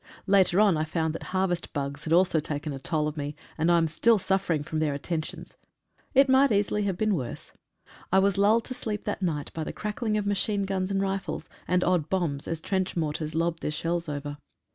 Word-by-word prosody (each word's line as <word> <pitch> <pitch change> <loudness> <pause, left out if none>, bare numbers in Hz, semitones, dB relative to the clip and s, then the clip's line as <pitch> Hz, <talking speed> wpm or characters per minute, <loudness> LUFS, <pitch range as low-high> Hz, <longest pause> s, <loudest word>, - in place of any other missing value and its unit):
Later 195 -2 +4
on 205 -6 +5
I 155 - +1
found 160 0 -1
that 165 - -6
harvest 185 -2 -1
bugs 140 0 -4
had 160 - -3
also 175 -1 +4
taken 145 -1 -4
toll 150 +2 0
of 150 - -4
me, 145 0 -4 0.2
and 160 +2 +2
I 170 - +5
am 165 - +3
still 215 +9 +3
suffering 190 -5 0
from 155 +1 -3
their 150 -2 0
attentions 155 +2 -5 0.3
— - - -38
it 275 +1 +7
might 265 0 +5
easily 205 0 +1
have 190 -3 -1
been 215 +1 +2
worse! 130 -9 -4 0.6
I 190 - +4
was 195 0 +4
lulled 215 +3 +3
to - - -5
sleep 215 -4 -4
that 205 - -3
night 155 -6 -2
by 160 - -3
the - - -4
crackling 215 +1 -2
of 210 - -1
machine 205 0 0
guns 190 -1 -1
and 195 0 0
rifles, 190 -5 -3 0.2
and 180 0 +2
odd 175 -4 +1
bombs, 165 -7 -1
as 165 -1 -3
trench 190 0 -1
mortars 155 -1 -2
lobbed 165 0 0
their - - -1
shells 165 +2 -2
over. 145 0 -5
175 Hz, 215 wpm, -27 LUFS, 155-200 Hz, 0.6 s, it